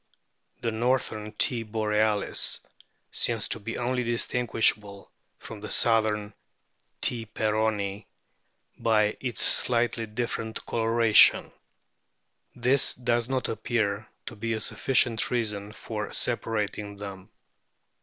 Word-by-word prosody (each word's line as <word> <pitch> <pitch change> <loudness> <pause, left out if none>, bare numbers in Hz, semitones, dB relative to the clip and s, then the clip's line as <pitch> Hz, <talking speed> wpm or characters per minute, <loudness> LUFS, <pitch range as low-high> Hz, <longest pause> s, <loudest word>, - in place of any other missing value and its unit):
The 115 - -1
northern 110 -2 -1
T. 115 +2 +2
borealis 105 -1 0 0.5
seems 115 -2 0
to - - 0
be 115 +2 -5
only 125 +1 -1
distinguishable 115 -4 0 0.3
from 110 -2 -10
the 105 - -7
southern 110 -2 +2 0.7
T. 115 -2 0
peronii 105 -2 -1 0.7
by 105 -2 +2
its 120 -6 0
slightly 115 -2 +2
different 110 0 -4
coloration; 115 -1 +5 1.0
this 125 +2 +2
does 120 -1 0
not 130 -2 -1
appear 110 -2 -1 0.2
to 120 - -7
be 115 +2 -3
a 110 - -2
sufficient 115 0 +1
reason 105 -4 -2
for 105 -1 -5
sepa 120 - -2
rating 105 -2 -3
them. 100 -1 -9
110 Hz, 105 wpm, -27 LUFS, 105-120 Hz, 1.0 s, coloration